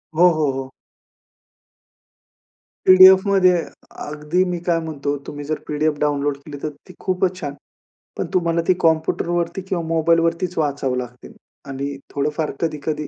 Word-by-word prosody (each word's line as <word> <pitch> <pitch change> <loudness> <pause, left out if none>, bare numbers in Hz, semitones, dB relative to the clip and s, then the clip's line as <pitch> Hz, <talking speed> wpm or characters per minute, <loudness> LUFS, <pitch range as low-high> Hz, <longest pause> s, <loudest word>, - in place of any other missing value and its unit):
हो, 175 +2 +6
हो, 150 -3 +1
हो. 135 0 -5 2.2
पी-डी-एफमध्ये 185 0 +7 0.5
अगदी 150 +5 -1
मी 175 -1 -2
काय 170 -2 +2
म्हणतो 145 -3 -3
तुम्ही 145 0 -6
जर 155 +1 -3
पी-डी-एफ 150 0 0
डाउनलोड 145 -1 0
केली 145 0 -10
तर 155 - -1 0.2
ती 180 - -12
खूपच 185 0 -1
छान. 145 -2 -4 0.6
पण - - -1
तुम्हाला 170 -2 +1
ती 185 - +5
कॉम्प्युटरवरती 170 +2 0
किंवा 175 -3 -1
मोबाईलवरतीच 165 +2 +1
वाचावं 140 -4 -1
लागतील 125 0 -8 0.4
आणि 140 +1 -4 0.2
थोडं 145 +1 0
फार 155 -2 -1
कधी-कधी 150 -2 -2
155 Hz, 135 wpm, -21 LUFS, 145-175 Hz, 2.2 s, पी-डी-एफमध्ये